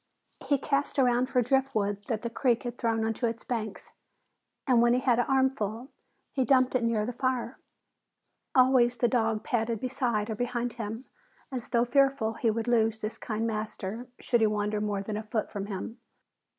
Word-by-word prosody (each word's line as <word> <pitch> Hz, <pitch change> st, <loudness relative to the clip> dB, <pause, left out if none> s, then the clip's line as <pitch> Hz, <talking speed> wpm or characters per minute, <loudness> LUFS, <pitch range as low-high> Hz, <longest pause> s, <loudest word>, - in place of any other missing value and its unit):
He 285 Hz, -, +3 dB
cast 280 Hz, +1 st, -1 dB
around 250 Hz, -1 st, +3 dB
for 250 Hz, -2 st, +2 dB
driftwood 220 Hz, -6 st, 0 dB
that 225 Hz, -3 st, -2 dB
the 235 Hz, -, -2 dB
creek 240 Hz, -1 st, +1 dB
had 240 Hz, -1 st, -4 dB
thrown 225 Hz, -1 st, +1 dB
onto 225 Hz, +2 st, 0 dB
its 230 Hz, 0 st, -4 dB
banks 220 Hz, -4 st, -4 dB, 0.7 s
and 250 Hz, -4 st, +4 dB
when 240 Hz, 0 st, +4 dB
he -, -, +2 dB
had 245 Hz, -2 st, +2 dB
an 245 Hz, -, +2 dB
armful, 265 Hz, -3 st, 0 dB, 0.4 s
he 265 Hz, -, +1 dB
dumped 255 Hz, -1 st, +3 dB
it 255 Hz, -2 st, +1 dB
near 225 Hz, -2 st, +1 dB
the 245 Hz, -, -2 dB
fire. 250 Hz, 0 st, -2 dB, 1.0 s
Always 250 Hz, -2 st, +5 dB
the 240 Hz, -, +3 dB
dog 225 Hz, -3 st, +1 dB
padded 230 Hz, -1 st, -1 dB
beside 240 Hz, -4 st, -1 dB
or -, -, -2 dB
behind 245 Hz, +1 st, -2 dB
him, 225 Hz, +2 st, -5 dB, 0.5 s
as 250 Hz, -3 st, -5 dB
though 235 Hz, 0 st, +2 dB
fearful 270 Hz, -3 st, +2 dB
he 225 Hz, 0 st, 0 dB
would 225 Hz, +1 st, -1 dB
lose 225 Hz, -2 st, +2 dB
this 215 Hz, 0 st, -5 dB
kind 225 Hz, 0 st, -2 dB
master 220 Hz, +1 st, -4 dB
should 240 Hz, -2 st, +1 dB
he 220 Hz, -, +5 dB
wander 210 Hz, 0 st, -1 dB
more 205 Hz, -2 st, -1 dB
than 210 Hz, +1 st, -4 dB
a -, -, -3 dB
foot 215 Hz, 0 st, -3 dB
from 200 Hz, -1 st, -4 dB
him. 215 Hz, +4 st, -6 dB
235 Hz, 185 wpm, -28 LUFS, 220-255 Hz, 1.0 s, Always